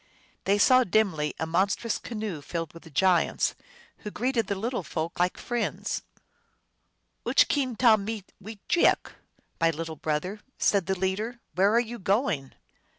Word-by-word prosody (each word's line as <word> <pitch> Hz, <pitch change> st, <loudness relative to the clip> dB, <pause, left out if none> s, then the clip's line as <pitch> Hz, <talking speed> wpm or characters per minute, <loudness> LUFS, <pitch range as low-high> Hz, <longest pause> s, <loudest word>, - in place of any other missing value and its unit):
They 200 Hz, +1 st, +3 dB
saw 255 Hz, +5 st, +6 dB
dimly 180 Hz, -9 st, +1 dB
a 160 Hz, -, 0 dB
monstrous 195 Hz, +7 st, 0 dB
canoe 215 Hz, -9 st, -5 dB
filled 165 Hz, +2 st, -5 dB
with 165 Hz, -1 st, -13 dB
giants, 180 Hz, +3 st, +2 dB, 0.4 s
who 210 Hz, -, -7 dB
greeted 235 Hz, 0 st, -1 dB
the 200 Hz, -, -1 dB
little 230 Hz, +4 st, -2 dB
folk 165 Hz, 0 st, -4 dB
like 180 Hz, +1 st, +1 dB
friends. 240 Hz, -1 st, -2 dB, 0.6 s
" -, -, -48 dB
Uch -, -, +5 dB
keen, 260 Hz, -5 st, 0 dB
tahmee 220 Hz, -3 st, +3 dB, 0.2 s
wejeaok 220 Hz, -, +1 dB
f -, -, -22 dB, 0.2 s
" -, -, -37 dB
" -, -, -43 dB
My 165 Hz, -, +5 dB
little 160 Hz, 0 st, -4 dB
brother," 160 Hz, +8 st, -2 dB, 0.2 s
said 200 Hz, -4 st, +2 dB
the 190 Hz, 0 st, 0 dB
leader, 205 Hz, +6 st, -2 dB
" -, -, -48 dB
where 195 Hz, +3 st, +3 dB
are -, -, +6 dB
you 240 Hz, 0 st, -4 dB
going? 195 Hz, -, 0 dB
195 Hz, 160 wpm, -27 LUFS, 165-225 Hz, 0.6 s, saw